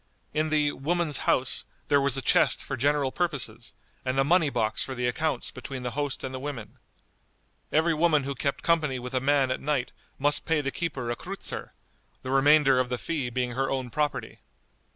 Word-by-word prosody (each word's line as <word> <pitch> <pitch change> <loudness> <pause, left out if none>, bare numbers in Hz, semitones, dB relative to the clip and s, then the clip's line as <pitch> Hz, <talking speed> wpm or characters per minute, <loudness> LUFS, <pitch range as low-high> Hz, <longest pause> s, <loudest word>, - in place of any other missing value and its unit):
In 155 +1 +1
the 150 -1 +2
"woman's 160 0 -1
house" 130 0 +2 0.2
there 145 -1 +4
was 135 -1 +1
a 135 - -3
chest - - +4
for - - -4
general 140 +1 +1
purposes, 130 -10 -3 0.3
and 130 0 -1
a 135 - +4
money 165 +1 +3
box 110 -4 0
for 130 - -5
the 125 0 -2
accounts 155 +5 -1
between 130 -3 -7
the 125 - -3
host 145 +1 -3
and 130 - -4
the 130 - -4
women. 135 -5 -7 0.9
Every 160 +2 +3
woman 155 -2 +3
who 140 +1 -3
kept 140 +1 -2
company 155 -6 +2
with 125 +1 -6
a 130 - +2
man 135 0 +2
at - - -2
night 140 -3 -1 0.3
must 145 +2 +4
pay 160 -1 +1
the 140 -2 -2
keeper 135 -8 -3
a - - -1
kreutzer, - - -6 0.5
the 130 - -4
remainder 135 -1 +5
of 130 -1 0
the 125 - -1
fee 145 -3 -2
being 125 0 -1
her 135 +2 -1
own 130 -2 -2
property. 150 +1 -2
135 Hz, 195 wpm, -27 LUFS, 130-150 Hz, 0.9 s, remainder